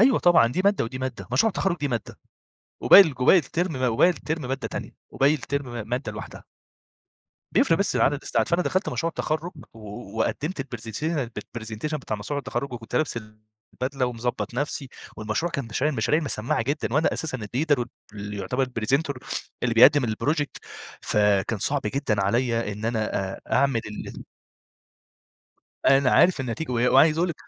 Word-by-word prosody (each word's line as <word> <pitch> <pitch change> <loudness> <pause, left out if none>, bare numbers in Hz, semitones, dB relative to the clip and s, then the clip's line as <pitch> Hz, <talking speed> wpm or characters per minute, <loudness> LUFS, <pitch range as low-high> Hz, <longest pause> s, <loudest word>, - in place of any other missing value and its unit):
أيوه، 245 +1 +5
طبعًا 175 -9 +5
دي 125 +10 -1
مادة 200 - +3
ودي 120 +3 -6
مادة 130 -7 -5
مشروع 135 - +4
التخرّج 195 -3 -1
دي 145 -4 -2
مادة، 120 -4 -4 0.6
وباقي 200 - +10
الج 150 -8 -5
وباقي 130 - +7
الترم 170 +5 -2
م 130 -1 -3
وباقي 115 +10 +5
الترم 160 -2 -3
مادة 135 0 -3
تانية، - - -7
وباقي 140 +2 +3
الترم 140 -1 -3
م 115 -3 -5
مادة 125 +4 -2
لوحدها. - - -9 1.1
بيفرِق 165 - +3
بس 200 - +1
في - - +2
عدد 145 +1 +2
الساعات، - - 0
فأنا 170 +1 +2
دخلت 185 +2 0
مشروع 165 - -1
التخرُّج 160 +1 -3 0.2
و 105 0 -9
وقدِّمت 150 +8 -1 0.2
الpresentation 130 +5 -3
الpresentation 115 +7 -5
بتاع 130 -6 -4
مشروع 140 +8 -4
التخرُّج، 140 -1 -4
وكنت 115 -2 -5
لابس 155 -6 0 0.6
البدلة 130 0 -2
ومضبط 120 0 -3
نفسي، 140 +1 -2 0.3
والمشروع 110 +11 -2
كان 140 -4 -2
مشاريع 130 +7 -1
مشاريع 125 +8 +1
مسمعّة 115 -6 -1
جدًا، 140 0 -2
وأنا 150 +3 +2
أساسًا 145 -5 -3
الleader 135 +7 0 0.3
واللي 105 0 -6
يعتبر 125 +7 -1 0.2
presenter 140 +6 +1 0.5
اللي 120 -2 +1
بيقدم 130 +2 +7
الproject 145 +7 -1 0.4
فكان 105 0 +2
صعب 140 +8 0
جدًا 105 -3 0
عليَّ 115 0 0
إن 105 +2 -7
أنا 110 -2 -1 0.2
آآ، - - -9
أعمل 135 -3 +3
ال 105 - -8 1.6
أنا 135 -1 +5
عارف 175 +1 +4
النتيجة 130 +3 -4
و - - -1 0.2
وعايز 155 0 +6
أقول 175 +2 +2
لِك 170 - -3
130 Hz, 165 wpm, -25 LUFS, 115-155 Hz, 1.6 s, وباقي